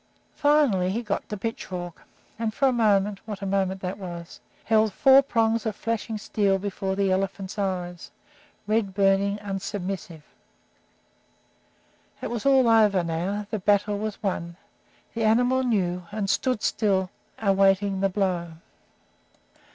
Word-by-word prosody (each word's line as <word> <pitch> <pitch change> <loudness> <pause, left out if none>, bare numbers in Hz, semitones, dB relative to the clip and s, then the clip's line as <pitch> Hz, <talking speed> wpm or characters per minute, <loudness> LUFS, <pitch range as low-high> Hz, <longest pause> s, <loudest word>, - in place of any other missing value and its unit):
Finally, 290 -12 +3
he 225 +5 -2
got 210 -3 -3
the 210 - -4
pitchfork, 190 -6 -5 0.4
and 225 -2 -2
for 275 - +3
a - - +3
moment 205 -3 +2
what 205 -2 -6
a - - -2
moment 190 -1 -1
that 185 +2 -4
was! 175 -3 -8 0.2
held 220 -1 +3
four 270 +7 +6
prongs 230 -4 +1
of 220 -3 -2
flashing 225 0 -3
steel 200 -2 +1
before 195 0 -3
the 195 -1 +1
elephant's 195 +1 -2
eyes, 180 -3 -3 0.6
red 210 -2 0
burning, 200 0 +2
unsubmissive. 195 -4 -5 2.0
It - - -5
was 240 +2 -2
all 265 -3 +5
over 210 -5 +4
now, 180 +5 -2
the 215 - -1
battle 205 +1 +1
was 215 0 -5
won, 170 -3 -3 0.6
the 225 - -2
animal 245 +4 +3
knew, 180 -7 -1
and 210 -1 -2
stood 255 -5 0
still 190 -4 +1 0.3
awaiting 195 -1 +2
the 195 - +2
blow. 180 -4 -1
200 Hz, 135 wpm, -25 LUFS, 190-220 Hz, 2.0 s, four